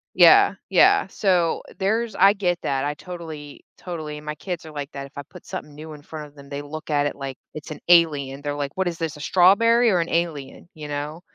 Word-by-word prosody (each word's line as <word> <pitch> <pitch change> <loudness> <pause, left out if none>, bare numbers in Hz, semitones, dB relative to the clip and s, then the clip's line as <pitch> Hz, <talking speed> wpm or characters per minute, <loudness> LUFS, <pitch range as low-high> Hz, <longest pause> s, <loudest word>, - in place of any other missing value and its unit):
Yeah, - - +7
yeah. - - +5
So 180 -4 +1 0.2
there's 215 +2 -1
I 195 +2 +6
get 180 -4 -1
that. 135 0 -1
I 145 - -1
totally 160 -5 -9
totally, 155 -4 -6
and 150 - -12
my 150 0 -4
kids 175 +1 -6
are 155 - -10
like 145 -1 -6
that. 140 0 -6
If 140 - -16
I - - -3
put - - -15
something 150 - -7
new 155 +1 -9
in 150 - -12
front 155 0 -8
of 145 - -22
them, 140 -1 -14
they 140 0 -5
look 155 +2 -8
at 145 -1 +2
it 145 - -2
like 135 -2 -6 0.2
it's 155 0 -9
an 155 - -7
alien. 145 -6 +3
They're 145 0 -3
like, 145 -1 -3
"What 190 -1 0
is 170 - -3
this, 165 -2 -4
a - - -12
strawberry 230 +9 +4
or 180 - +2
an 170 - -1
alien?" 165 -4 -3
You 155 -2 -8
know? 145 +3 -5
155 Hz, 240 wpm, -23 LUFS, 145-175 Hz, 0.2 s, Yeah